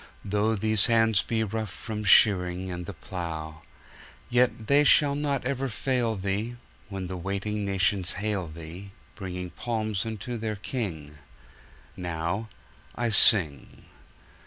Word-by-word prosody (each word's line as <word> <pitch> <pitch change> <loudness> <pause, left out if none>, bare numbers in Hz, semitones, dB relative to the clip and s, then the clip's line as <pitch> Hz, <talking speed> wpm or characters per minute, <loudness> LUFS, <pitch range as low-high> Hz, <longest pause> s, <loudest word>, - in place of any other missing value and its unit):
Though 105 +2 +1
these 110 0 +2
hands 110 -4 +4
be 110 +1 -1
rough 110 0 -3
from 105 +3 -6
shearing 95 -3 +5
And 90 -1 -6
the 100 - -5
plough, 80 -2 -6 0.7
Yet 120 -2 +2
they 140 +5 +5
shall 145 0 +5
not 140 -3 -1
ever 135 0 -1
fail 120 -1 0
Thee, 100 +5 -2 0.3
When 95 -2 -4
the 95 +1 -5
waiting 100 +3 -3
nations 95 -1 +1
hail 100 -2 -2
Thee, 85 +5 -9 0.2
Bringing 90 -2 -6
palms 110 0 -2
unto 115 +2 -5
their 110 -1 -2
King. 85 - -5 0.8
Now 85 +5 -3 0.5
I 120 0 0
sing. 90 - +3
100 Hz, 130 wpm, -27 LUFS, 90-115 Hz, 0.8 s, shearing